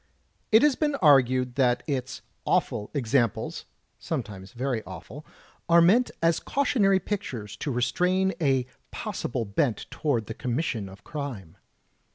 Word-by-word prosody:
It 220 +4 +7
has 295 -3 +4
been 295 0 0
argued 130 - +4
that 125 -2 +2
its 130 -4 -3 0.2
"awful 105 - 0
examples" 120 -5 0 0.3
(sometimes 105 - -5
very 125 -1 -2
awful!), 95 - -10 0.5
are 170 0 +7
meant 205 +9 +5
as 165 0 +3
cautionary 225 -9 +2
pictures 125 - -5
to 145 - -4
restrain 180 +10 +1
a 135 -4 +2 0.2
possible 120 -2 -3
bent 110 +4 0
toward 130 -8 -1
the 110 - -6
commission 120 -5 -2
of 95 +1 -14
crime. 130 - -6
130 Hz, 130 wpm, -26 LUFS, 115-170 Hz, 0.5 s, It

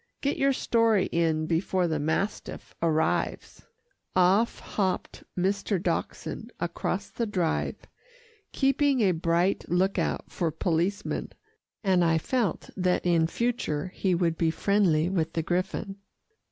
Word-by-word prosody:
Get 280 - 0
your 275 0 +3
story 230 -5 +2
in 160 -2 +1
before 175 +2 +1
the 155 -2 -1
mastiff 160 +8 -2
arrives." 160 -1 0 0.5
Off 190 +5 +3
hopped 190 -3 -2
Mr. 195 +1 0
Dachshund 185 - -3
across - - -2
the 235 - -2
Drive, 180 -6 -1 0.7
keeping 275 -1 +2
a 195 -3 +4
bright 170 +2 +1
look 185 +3 +2
out - - -2
for 170 -3 -1
policemen, 175 +5 -1 0.5
and 185 -3 +3
I 165 -1 +3
felt 225 +3 -1
that 180 -1 +1
in 165 -2 +3
future 185 -8 -1
he 185 -2 +1
would 170 -2 0
be 165 - +3
friendly 175 -3 +2
with 165 -3 -1
the 165 - -1
griffon. 190 +3 -2
180 Hz, 125 wpm, -27 LUFS, 165-205 Hz, 0.7 s, a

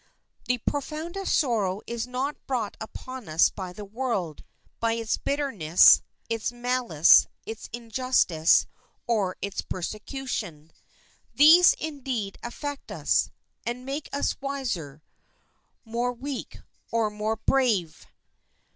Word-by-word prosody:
The 250 - +1
profoundest 315 - -2
sorrow 210 - 0
is 235 0 -4
not 260 +4 -4
brought 240 -6 -2
upon 255 0 -8
us 155 +2 +4
by 185 -2 -6
the 205 +3 -9
world, 200 - -3 0.4
by 230 0 +1
its 230 -1 -1
bitterness, 225 - +5 0.3
its 230 0 -2
malice, 240 -10 +4 0.2
its 225 0 -7
injustice, 230 -8 +2 0.4
or 205 -6 0
its 200 -1 -2
persecution. 185 - -5 0.6
These, 330 +5 +8
indeed, 260 -10 -4
affect 285 +4 -6
us, - - +1 0.3
and 245 +2 -4
make 280 +2 -4
us 280 - -1
wiser, 220 - -4 0.8
more 240 +2 -1
weak, 265 +2 -6 0.3
or 225 -2 +1
more 210 +1 -2
brave. 220 -9 0
235 Hz, 110 wpm, -26 LUFS, 200-270 Hz, 0.8 s, These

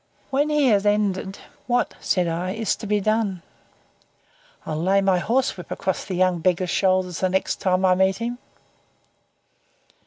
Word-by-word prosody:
When 285 +3 +1
he 300 -2 +2
had 205 -2 +2
ended, 200 -2 0 0.3
"What," 245 0 +1
said 180 -2 0
I, 175 +3 -2
"is 220 -1 -1
to 215 - -7
be 210 0 +1
done?" 205 -3 -1 1.2
"I'll 155 0 -3
lay 190 +3 +3
my 190 -2 +2
horsewhip 235 -2 -1
across 190 -1 -3
the 185 - -4
young 180 -1 +2
beggar's 180 +1 0
shoulders 185 -2 +1
the 185 - +1
next 190 +1 -1
time 185 0 +1
I 185 - +5
meet 190 +1 +2
him." 240 +1 -4
190 Hz, 155 wpm, -23 LUFS, 185-215 Hz, 1.2 s, I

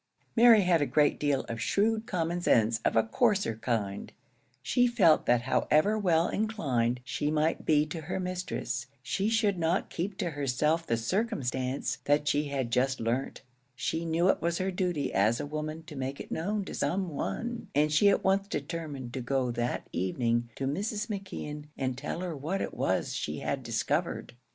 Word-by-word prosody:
Mary 230 -2 +8
had 175 -4 +3
a 145 - +1
great 150 -1 +3
deal 145 -2 +1
of 115 0 -6
shrewd 220 - +1
common 175 -1 -1
sense 115 -7 +3
of - - +2
the 115 - +4
coarser 200 - +1
kind; 110 -4 -2 0.5
she 245 - +3
felt 195 -10 +4
that 120 -1 +3
however 155 - +2
well 175 -6 +2
inclined 130 - 0
she 145 +3 -2
might 155 +1 0
be 150 -1 +4
to 160 +1 -6
her 170 +5 -3
mistress, 180 -8 -3 0.2
she 200 +9 0
should 215 -5 +2
not 165 +3 0
keep 190 +3 -3
to 175 - -2
herself 150 +4 0
the 115 - +1
circumstance 135 - -1
that 145 +1 +2
she 150 0 +2
had 135 -4 -2
just 130 +2 +1
learnt; 120 +5 -2 0.3
she 160 +5 -2
knew 165 +2 +1
it - - +3
was 170 0 0
her 190 +1 -1
duty 180 -5 -1
as 110 +4 +3
a - - -3
woman 155 +2 -4
to 155 - -10
make 135 +1 -4
it - - -8
known 200 +5 -1
to - - -7
some 190 +1 0
one, 230 - -4
and 150 +1 +3
she 180 +7 +5
at 200 - +2
once 195 +1 +2
determined 145 -6 -5
to 130 - -3
go 125 0 0
that 120 +1 -2
evening 115 +6 0
to 135 - -3
Mrs. 205 - -2
McKeon 185 -7 -5
and 130 -2 -1
tell 150 +6 -4
her 175 -3 -3
what 160 +8 -2
it - - -3
was - - 0
she - - -3
had - - -2
discovered. - - -2
155 Hz, 185 wpm, -29 LUFS, 130-190 Hz, 0.5 s, Mary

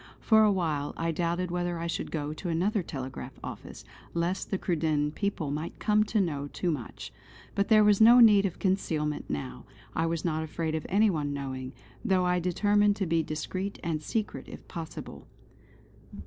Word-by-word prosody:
For 220 -1 +5
a 210 - +5
while 155 -6 -1
I 165 0 0
doubted 170 +2 -1
whether 175 -1 -1
I 165 - -4
should 170 - -3
go 150 -1 -3
to 175 +3 -5
another 190 +6 +1
telegraph 130 -4 -7
office, - - -8 0.3
lest 175 +3 -1
the 195 - 0
Cruden 155 -5 0
people 160 -4 -2
might 155 +3 -4
come 215 -1 +3
to 215 0 0
know 145 -7 -1
too 175 +4 -2
much. 135 -7 -6 0.4
But 200 - +1
there 215 -1 +6
was 210 0 +4
no 235 +3 +9
need 205 -4 +7
of 180 - -8
concealment 160 -6 -1
now. 70 -4 -4 0.3
I 165 - +1
was 165 0 -2
not 160 -2 0
afraid 160 0 -3
of 160 - -3
any 210 +2 +4
one 145 -4 -2
knowing, 130 -2 -5 0.3
though 185 -1 +2
I 180 0 +2
determined 205 +4 +2
to 200 - -1
be 165 -1 +2
discreet 185 +6 -4
and 165 -3 -1
secret 215 +7 -3
if - - -11
possible. 165 -2 -8
170 Hz, 180 wpm, -29 LUFS, 155-195 Hz, 0.4 s, no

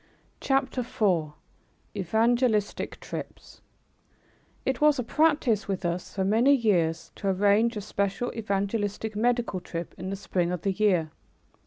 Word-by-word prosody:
CHAPTER 270 -1 0
IV 180 -10 0 0.6
EVANGELISTIC 220 +3 +1
TRIPS - - -8 1.0
It 265 0 -1
was 300 -1 +5
a 250 - -1
practice 290 -6 +2
with 190 -2 -3
us 175 +2 -3
for 190 -1 0
many 235 +8 +4
years 175 -9 +1
to 200 - -4
arrange 205 +4 +3
a - - -3
special 200 +4 -2
evangelistic 205 0 -2
medical 235 -3 0
trip 170 -1 -6
in 185 +2 -4
the 195 - -2
spring 180 -3 -1
of 180 -2 -4
the 195 - +1
year. 185 -6 +1
205 Hz, 135 wpm, -27 LUFS, 185-235 Hz, 1.0 s, was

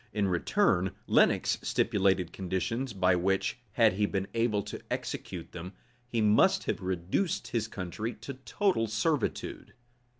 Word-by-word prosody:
In 105 -2 +1
return, 90 0 +2
Lenox - - +3
stipulated 95 -5 +1
conditions, 100 +7 -2
by 95 -3 +3
which, 95 +5 0
had 115 -3 +5
he 105 +2 +1
been 95 -1 -1
able 115 -3 +1
to 105 - -7
execute 85 -3 -4
them, 90 +2 -7 0.3
he 115 -2 -1
must 105 0 +4
have - - -2
reduced 95 - -1
his 115 -2 -1
country 105 +3 -5
to 140 - -7
total 135 - 0
servitude. 110 +8 -2
100 Hz, 135 wpm, -30 LUFS, 95-115 Hz, 0.3 s, had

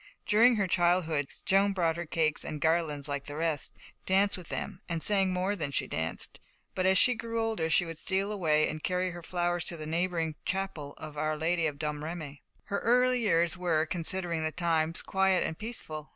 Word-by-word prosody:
During 230 +3 +5
her 205 -2 +1
childhood, 175 -5 +2 0.2
Joan 195 +1 +3
brought 170 -4 +1
her 170 0 -5
cakes 155 -1 0
and 155 - -5
garlands 160 -3 +1
like 140 -1 -3
the 145 - -7
rest, 160 -2 -1 0.4
danced 195 +2 +3
with 180 -3 -10
them, 200 -2 -4
and 165 -2 -2
sang 195 -2 +3
more 185 +3 0
than 155 -7 -3
she 140 - 0
danced; 80 +1 -4 0.3
but 185 0 +1
as 190 0 +5
she 250 - +6
grew 230 0 -4
older, 220 -8 0
she 170 +2 +4
would 165 -1 -7
steal 195 +2 -1
away 155 -7 +2
and 155 0 -5
carry 180 0 0
her 175 0 -8
flowers 175 0 -1
to 170 - -3
the 155 - -6
neighbouring 165 0 -1
chapel 185 -7 -3
of 155 -2 -8
Our 155 0 0
Lady 165 +1 +1
of 145 -2 -4
Domremy. 150 0 -5 0.2
Her 200 - -2
early 250 +1 +3
years 170 -6 +2
were, 165 -3 +1
considering 170 0 0
the 155 0 -1
times, 165 -1 0
quiet 190 -1 +2
and 160 - -3
peaceful. 160 - -6
170 Hz, 195 wpm, -30 LUFS, 155-190 Hz, 0.4 s, she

